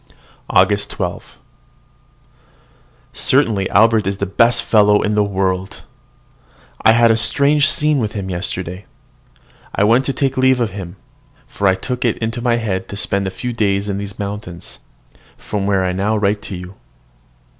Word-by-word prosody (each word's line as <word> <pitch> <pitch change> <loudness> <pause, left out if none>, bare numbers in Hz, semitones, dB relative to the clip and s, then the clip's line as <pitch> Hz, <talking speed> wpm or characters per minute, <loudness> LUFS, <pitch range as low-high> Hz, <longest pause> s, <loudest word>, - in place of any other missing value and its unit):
AUGUST - - +2
12. - - -6 1.8
Certainly 110 -8 +1
Albert 110 0 +3
is 100 0 -2
the 100 - -2
best 115 +5 +3
fellow 105 -1 +3
in 105 - 0
the 105 0 +2
world. 95 -1 -2 1.0
I 110 - +5
had 115 0 +4
a - - +3
strange 140 +5 +3
scene 150 -1 +2
with 110 -3 -2
him 100 -3 -5
yesterday. 90 0 -4 0.9
I - - +2
went 120 +5 +3
to 135 - -1
take 135 0 -1
leave 130 0 +3
of 115 -4 -1
him; 95 -2 -8 0.5
for 100 - -2
I 95 - +4
took 125 +6 -4
it 120 -3 0
into 115 +1 -3
my 120 -1 +1
head 100 -5 -3
to 100 - -7
spend 100 -1 -1
a - - -1
few 120 +6 -5
days 100 -3 0
in 100 -1 -3
these 100 -1 -7
mountains, 100 -4 -7 0.6
from 100 -2 -4
where 95 -2 +1
I 90 - 0
now 100 +4 0
write 105 0 0
to 95 - -6
you. 90 +1 -9
105 Hz, 165 wpm, -18 LUFS, 95-115 Hz, 1.8 s, I